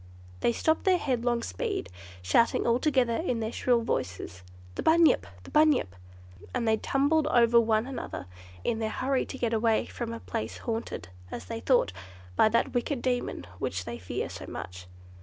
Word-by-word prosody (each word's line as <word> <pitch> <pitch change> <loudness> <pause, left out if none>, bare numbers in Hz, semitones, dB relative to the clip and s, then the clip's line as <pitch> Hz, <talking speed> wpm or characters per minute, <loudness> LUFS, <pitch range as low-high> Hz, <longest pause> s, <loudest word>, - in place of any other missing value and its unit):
They - - +2
stopped 315 +9 0
in 375 - +7
their - - +4
headlong 240 -5 0
speed, 90 - -3 0.4
shouting 230 - +3
all 235 +1 +3
together 255 -6 +2
in 250 -9 -1
their 220 0 -2
shrill 240 -1 +2
voices, 90 - -3 0.3
"The - - -4
Bunyip! 325 0 +4 0.2
The - - -12
Bunyip!" 300 - +3 0.6
and 240 -2 0
they 220 0 +4
tumbled 290 +5 +2
over 235 -4 +5
one 220 0 +2
another 260 - -5 0.4
in 225 - 0
their 220 -1 -1
hurry 260 +4 0
to - - -6
get 235 -3 -1
away 225 0 +2
from 235 -2 -5
a 230 - -5
place 225 - -4
haunted, 225 - -4 0.2
as - - -6
they 230 0 -5
thought, 245 - +2 0.4
by 215 - +5
that 230 +2 +1
wicked 245 +1 -1
demon 245 - -1
which 90 +1 -2
they 120 0 -6
fear 90 - -3
so - - -8
much. 90 0 -7
235 Hz, 175 wpm, -28 LUFS, 220-260 Hz, 0.6 s, in